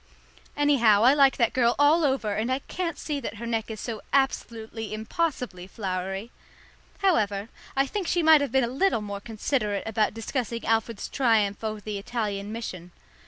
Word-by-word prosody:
Anyhow, 240 -8 +4
I 255 +3 +7
like 275 -2 +4
that 235 -3 +2
girl 240 -2 +3
all 300 +4 +5
over, 265 -7 +1
and 220 +4 -1
I 260 - +2
can't 335 +3 -4
see 295 -1 -3
that 230 -4 -5
her 230 +2 -7
neck 225 -1 -2
is 220 -1 -6
so 225 -2 -5
absolutely 225 -5 -1
impossibly 225 - -3
flowery. 195 +2 -4 0.7
However, 210 - +2 0.3
I 270 0 +3
think 375 +5 -3
she 350 -2 +1
might 315 -2 +7
have 285 - -1
been 265 -1 +3
a - - +1
little 270 - +1
more 200 -1 -5
considerate 215 -1 -1
about 220 -1 0
discussing 235 0 -3
Alfred's 225 -1 0
triumph 220 -6 +1
over 215 -1 -3
the 205 -1 -4
Italian 205 -2 -3
mission. 185 -6 -6
230 Hz, 170 wpm, -26 LUFS, 210-270 Hz, 0.7 s, I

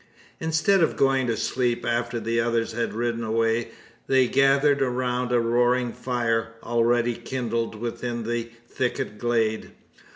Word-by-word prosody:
Instead 165 +4 +2
of 165 - +1
going 135 -2 +2
to 115 -2 0
sleep, 120 +2 -1
after 120 0 -1
the 115 +1 -1
others 115 0 0
had 115 +1 -2
ridden 115 0 -1
away, 115 +1 +1 0.4
they 130 -1 +4
gathered 140 +2 +3
around 125 -1 -1
a 120 - +3
roaring 120 +1 +2
fire, 115 -2 -1
already 120 0 +2
kindled 115 -2 -3
within 120 +1 -4
the 115 0 -3 0.2
thicket 120 -5 -3
glade. 115 -2 0
120 Hz, 135 wpm, -25 LUFS, 115-125 Hz, 0.4 s, they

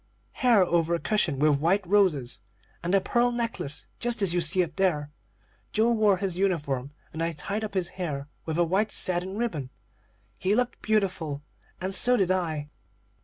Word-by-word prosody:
Hair 235 -7 +4
over 170 -1 +1
a - - -2
cushion 175 -9 +1
with 145 0 +3
white 185 +6 +2
roses, 170 - +2 0.4
and 175 - -2
the 195 - +5
pearl 240 +5 +2
necklace, 230 -12 -3
just 240 -3 0
as 180 -3 +2
you 175 - +2
see 175 +3 +2
up 165 -2 -7
there. 150 -6 0 0.6
Joe 225 +2 +3
wore 215 -4 +3
his 185 -2 -3
uniform, 145 -9 0 0.2
and 160 - -4
I 165 0 0
tied 200 +8 -3
up 210 -2 -5
his 180 -2 0
hair 150 -7 -4 0.2
with 160 0 -3
a 175 - +4
white 195 +5 +1
satin 185 +2 -1
ribbon. 165 - -2 0.7
He 195 +3 +2
looked 250 +1 -1
beautiful, 185 -9 -1 0.4
and 185 +1 -2
so 245 +6 +5
did 185 -3 +2
I." 160 -5 -2
185 Hz, 175 wpm, -27 LUFS, 160-205 Hz, 0.7 s, the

